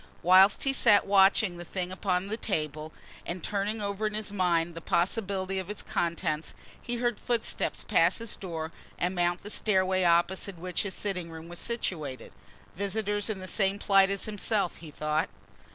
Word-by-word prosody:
Whilst 190 +3 +6
he 270 - +2
sat 205 -5 +5
watching 195 -1 +4
the 175 - -7
thing 180 +1 -4
upon 185 -1 -1
the 210 +2 -2
table 155 -7 -3 0.3
and 175 0 -5
turning 210 +1 -2
over 200 +1 -1
in 210 - -4
his 215 -1 -4
mind 175 -3 +1
the 165 - -8
possibility 190 +1 0
of 190 0 -6
its 210 - -4
contents, 165 -2 -2 0.3
he 240 - -3
heard 240 -1 -1
footsteps 235 -2 -1
pass - - +3
his 230 -2 -4
door 165 -4 -5 0.3
and 180 +2 -1
mount 175 -1 0
the 210 - -7
stairway 185 -3 +1
opposite 175 +2 +2
which 180 +1 -2
his 195 -2 -4
sitting 180 -5 -3
room 160 0 -9
was 175 0 -7
situated. 160 - -3 0.4
Visitors 205 +2 -1
in 200 -3 -3
the 185 - -6
same 195 0 0
plight 195 -1 +4
as 200 -1 -1
himself, 205 -2 0
he 165 - -10
thought. 150 +1 -1
190 Hz, 175 wpm, -28 LUFS, 175-205 Hz, 0.4 s, Whilst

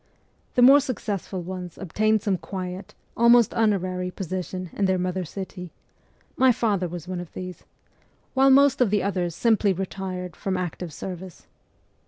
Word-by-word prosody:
The 245 - +5
more 275 +3 +9
successful 205 -8 -4
ones 180 -1 -7
obtained 215 +3 +1
some 190 -4 0
quiet, 185 -1 -6 0.2
almost 235 -1 +5
honorary 185 -5 0
position 185 -1 -5
in 200 - 0
their 190 -1 +2
mother 180 +1 -2
city 180 +1 -7 0.7
my 260 -1 +5
father 210 -6 0
was 175 0 -7
one 185 -1 -4
of 175 -2 -8
these 180 -1 -8 0.7
while 270 0 +5
most 275 0 +5
of 245 - +4
the 205 0 +1
others 180 -4 -1
simply 220 -4 +3
CHILDHOOD - - -10
5 - - -7 0.2
retired 180 -2 -5
from 190 -1 -2
active 180 -1 -4
service. 180 +2 -8
190 Hz, 160 wpm, -25 LUFS, 180-215 Hz, 0.7 s, more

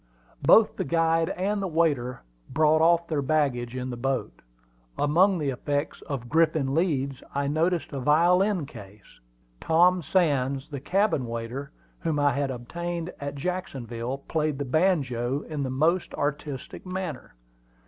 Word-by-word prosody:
Both - - +5
the - - 0
guide 165 +1 +2
and 200 +3 -1
the 195 - -1
waiter 150 - 0 0.3
brought 155 +2 +3
off 170 +1 +4
their 155 -3 0
baggage 130 -4 0
in 130 0 -3
the - - -4
boat. 135 +2 -2 0.6
Among 180 +7 +3
the 145 -4 -1
effects 145 +3 -3
of 130 -4 -4
Griffin 155 -2 +2
Leeds 140 -5 0
I 140 0 0
noticed 160 +2 0
a 140 - -3
violin 175 +6 +3
case. 100 - -14 0.4
Tom 175 +3 +4
Sands, 140 -5 +1
the 140 -3 -5
cabin 180 - +1
waiter, 115 +4 -5 0.3
whom 160 -3 -1
I 145 -1 +3
had 140 -1 -1
obtained 170 +7 -4
at 140 0 -5
Jacksonville, 135 -7 -4
played 155 -3 0
the 140 - -3
banjo 135 -5 +1
in 155 -3 -5
the 135 - -2
most 160 +7 +1
artistic 145 -2 -4
manner. 185 - -5
145 Hz, 145 wpm, -26 LUFS, 135-170 Hz, 0.6 s, Both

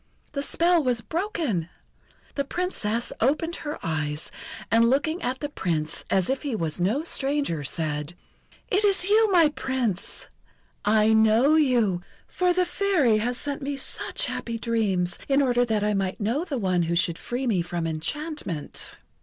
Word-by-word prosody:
The 280 - -2
spell 340 +3 +2
was 245 -3 +1
broken! 315 - -2 0.6
The 280 - -1
Princess 255 - -2
opened 310 +7 +1
her 300 0 -5
eyes, 155 -1 -2 0.4
and, 230 +1 +5
looking 315 +6 +1
at 255 +2 -2
the 290 - -1
Prince 160 - -2
as 190 -2 +2
if 265 0 -1
he 280 -6 -2
was 165 -3 -2
no 220 - +1
stranger, 280 - -1
said: 150 +2 -2 0.6
"Is 395 +3 +3 0.2
it 370 - -2
you, 435 0 +5
my 335 -4 +6
Prince! 255 -9 -2 0.6
I 215 +1 +4
know 220 +6 +5
you, 240 - +3 0.3
for 360 -1 +1
the 360 +1 +2
Fairy 350 - +2
has 245 +3 -1
sent 285 +1 -4
me 280 0 -3
such 270 - -3
happy 230 -1 -4
dreams 200 -7 0
in 275 0 +4
order 245 -3 +3
that 220 -3 0
I 210 0 +1
might 195 -2 -1
know 235 - 0
the 285 -6 -3
one 185 -5 +1
who 170 0 0
should 170 -1 +1
free 245 +2 -3
me 205 -8 +2
from 170 -1 -3
enchantment." 165 - -2
235 Hz, 160 wpm, -25 LUFS, 185-295 Hz, 0.6 s, my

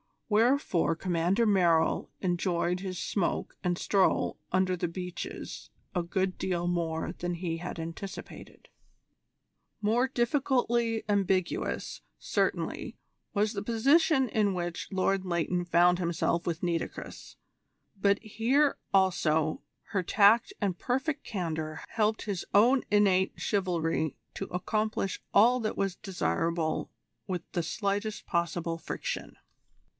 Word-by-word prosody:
Wherefore 225 - +3
Commander 180 +5 +1
Merrill 175 -6 +3
enjoyed 175 -1 0
his 185 -1 -5
smoke 195 +1 -2
and 175 -1 0
stroll 195 0 +2
under 185 0 +2
the 175 - -1
beeches 180 +1 -6 0.2
a 180 - +1
good 185 +2 -1
deal 175 -2 -1
more 165 -2 -1
than 175 0 -2
he 170 -1 -3
had 175 +1 -6
anticipated. 165 +4 -8 1.1
More 230 +5 +2
difficultly 240 -3 +1
ambiguous, 190 -3 0 0.2
certainly, - - -1 0.4
was 210 +1 +1
the 200 - -3
position 265 +6 +3
in 210 -2 +2
which 175 -2 -3
Lord 190 0 +1
Leighton 175 0 0
found 175 +1 +4
himself 170 0 0
with 170 0 -2
Nitocris, 170 -2 -4 0.6
but 200 0 +4
here 245 +7 +2 0.2
also 160 -5 +2 0.3
her 200 - 0
tact 205 +5 +4
and 190 -4 -1
perfect 265 +4 -1
candour 160 -6 -3
helped 215 -1 0
his 200 -5 -3
own 245 +6 +5
innate 195 -2 +3
chivalry 165 -6 0 0.2
to 195 - -3
accomplish 210 +2 -2
all 240 +5 +6
that 215 -2 -2
was 195 -2 0
desirable 170 -4 -1 0.4
with 180 -2 -3
the 175 - 0
slightest 200 +4 -2
possible 170 -1 -1
friction. - - -5
185 Hz, 115 wpm, -29 LUFS, 170-215 Hz, 1.1 s, all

